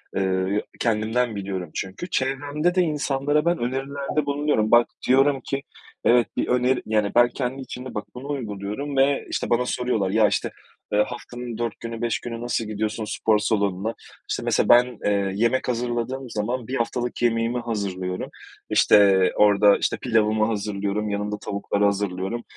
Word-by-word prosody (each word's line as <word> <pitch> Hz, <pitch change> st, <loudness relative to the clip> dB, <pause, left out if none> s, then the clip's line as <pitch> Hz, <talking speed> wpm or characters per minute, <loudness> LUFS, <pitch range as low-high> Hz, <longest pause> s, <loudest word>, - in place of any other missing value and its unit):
Iıı, 95 Hz, +1 st, 0 dB, 0.2 s
kendimden 115 Hz, +1 st, 0 dB
biliyorum 95 Hz, -4 st, -4 dB
çünkü. 100 Hz, -, -5 dB
Çevremde 145 Hz, +6 st, 0 dB
de 185 Hz, -, +4 dB
insanlara 150 Hz, -1 st, 0 dB
ben 175 Hz, 0 st, +2 dB
önerilerde 140 Hz, +4 st, -2 dB
bulunuyorum. 140 Hz, -6 st, +1 dB
Bak 120 Hz, 0 st, +6 dB, 0.2 s
diyorum 135 Hz, +1 st, +4 dB
ki, 135 Hz, 0 st, -3 dB, 0.4 s
evet 120 Hz, -1 st, +5 dB
bir -, -, 0 dB
öneri 125 Hz, +1 st, +2 dB
yani 105 Hz, -2 st, +1 dB
ben 120 Hz, 0 st, +6 dB
kendi 130 Hz, +1 st, -3 dB
içimde 130 Hz, 0 st, -7 dB
bak 105 Hz, -, -3 dB
bunu 130 Hz, +3 st, -8 dB
uyguluyorum 120 Hz, +2 st, -4 dB
ve 135 Hz, +1 st, +3 dB
işte -, -, -2 dB
bana 120 Hz, +1 st, +2 dB
soruyorlar, 120 Hz, -7 st, 0 dB
ya 110 Hz, +1 st, +4 dB
işte, -, -, -1 dB, 0.4 s
eee, 105 Hz, 0 st, +4 dB
haftanın 120 Hz, -1 st, -7 dB
4 120 Hz, -2 st, -3 dB
günü 115 Hz, 0 st, -6 dB
5 115 Hz, -3 st, 0 dB
günü 115 Hz, -1 st, -6 dB
nasıl 120 Hz, -2 st, -1 dB
gidiyorsun 110 Hz, +1 st, -3 dB
spor 105 Hz, +1 st, +1 dB
salonuna? 100 Hz, 0 st, 0 dB, 0.4 s
İşte -, -, -2 dB
mesela -, -, +1 dB
ben, 120 Hz, -1 st, +5 dB
eee, 100 Hz, -1 st, +1 dB
yemek 115 Hz, +5 st, +1 dB
hazırladığım 120 Hz, +1 st, -2 dB
zaman, 115 Hz, +3 st, -3 dB
bir 130 Hz, -, -3 dB
haftalık 120 Hz, 0 st, -2 dB
yemeğimi 115 Hz, +1 st, +1 dB
hazırlıyorum. 95 Hz, -5 st, -3 dB, 0.4 s
İşte 95 Hz, -3 st, +5 dB
orada 105 Hz, -1 st, +5 dB
işte -, -, -1 dB
pilavımı 110 Hz, -2 st, +2 dB
hazırlıyorum, 105 Hz, -1 st, -2 dB
yanında 105 Hz, +1 st, -2 dB
tavukları 100 Hz, 0 st, -2 dB
hazırlıyorum. 100 Hz, +2 st, -1 dB
115 Hz, 155 wpm, -24 LUFS, 105-130 Hz, 0.4 s, Bak